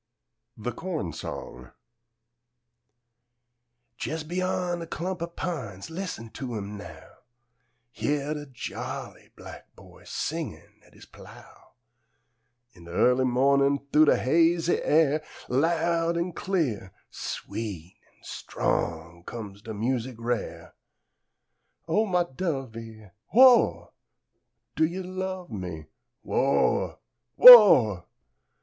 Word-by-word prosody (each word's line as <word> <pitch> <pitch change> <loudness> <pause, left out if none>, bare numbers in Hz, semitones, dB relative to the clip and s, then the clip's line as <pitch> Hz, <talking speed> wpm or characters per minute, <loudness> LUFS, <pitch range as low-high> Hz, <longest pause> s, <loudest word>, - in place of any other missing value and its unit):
THE 115 +3 -4
CORN 155 - -5
SONG 60 -5 -8 2.3
Jes' 160 +1 -3
beyan 180 +1 -2
a 165 - -7
clump 175 +2 -5
o' 170 - -2
pines, 150 - -6
Lis'n 160 - -6
to 125 -4 -6
'im 100 0 -6
now! 100 - -11 0.9
Hyah 145 0 -2
de 145 -1 -7
jolly 130 -2 -7
black - - -13
boy, - - -17
Singin', - - -6
at - - -24
his - - -15
plow! - - -16 1.0
In 85 -3 -16
de 85 - -11
early 125 +8 +3
mornin', 140 +3 +3 0.2
Thoo 155 +1 +6
de - - +4
hazy 165 +4 +2
air, 155 -1 +2 0.2
Loud 165 +4 +1
an' 170 +1 -2
clear, 140 - -2 0.2
sweet 95 -6 -7
an' - - -33
strong 85 +1 -3
Comes 100 -2 -9
de 110 0 -8
music 125 +3 -2
rare: 110 -9 -4 1.1
"O 215 +1 +1
mah 180 -2 +2
dovee, 115 - -6 0.2
Who 230 - +3
ah! 255 -2 +6 0.9
Do - - +1
you 180 +4 -4
love 185 -1 -5
me? 90 -7 -6 0.4
Who - - -8
ah! - - +1 0.4
Who 250 0 +14
ah!" 115 - +4
140 Hz, 110 wpm, -26 LUFS, 110-170 Hz, 2.3 s, Who